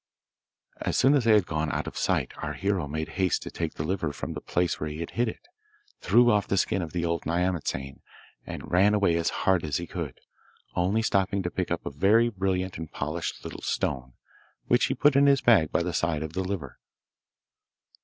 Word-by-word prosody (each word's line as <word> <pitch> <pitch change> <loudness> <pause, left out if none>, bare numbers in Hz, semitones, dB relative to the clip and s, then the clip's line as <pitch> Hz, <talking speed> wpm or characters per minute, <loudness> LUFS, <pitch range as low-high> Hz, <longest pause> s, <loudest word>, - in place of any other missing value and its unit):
As - - -2
soon 135 +3 +5
as 135 -5 +2
they 115 - +6
had 105 -4 +4
gone 80 -2 -2
out - - -2
of - - -7
sight - - 0
our - - -4
hero 95 -5 -1
made 80 +2 -3
haste 90 -2 +1
to - - -7
take 80 -2 -4
the - - -3
liver 85 -2 -1
from 70 - -5
the - - -6
place 90 0 -1
where 75 - -3
he 75 - -6
had 85 - -5
hid 120 +1 0
it, 335 - -10 0.5
threw 120 +1 +5
off 105 -1 +2
the 95 - 0
skin 95 +1 +1
of 80 -3 -5
the 85 -1 -2
old 85 -1 -1
nyamatsane, 85 -6 -2 0.4
and - - -8
ran 100 +4 +4
away 100 -5 +3
as 85 0 +1 0.2
hard 95 -3 +3
as 75 -2 -1
he 85 - -4
could, 85 -7 -6 0.6
only 95 +6 +1
stopping 100 -2 +1
to 85 - -2
pick 90 - -2
up - - -3
a - - -3
very 105 +11 +4
brilliant 95 -3 -2
and 80 -2 -7
polished 75 +4 -4
little - - -7
stone, 65 -1 -2 0.5
which - - +3
he - - -1
put 145 -1 +4
in 140 +1 +5
his 140 -3 +4
bag 100 -11 +4
by - - +1
the 90 0 -3
side 80 -3 0
of 80 0 -6
the 95 - -1
liver. 90 -8 -5
90 Hz, 215 wpm, -27 LUFS, 80-100 Hz, 0.6 s, they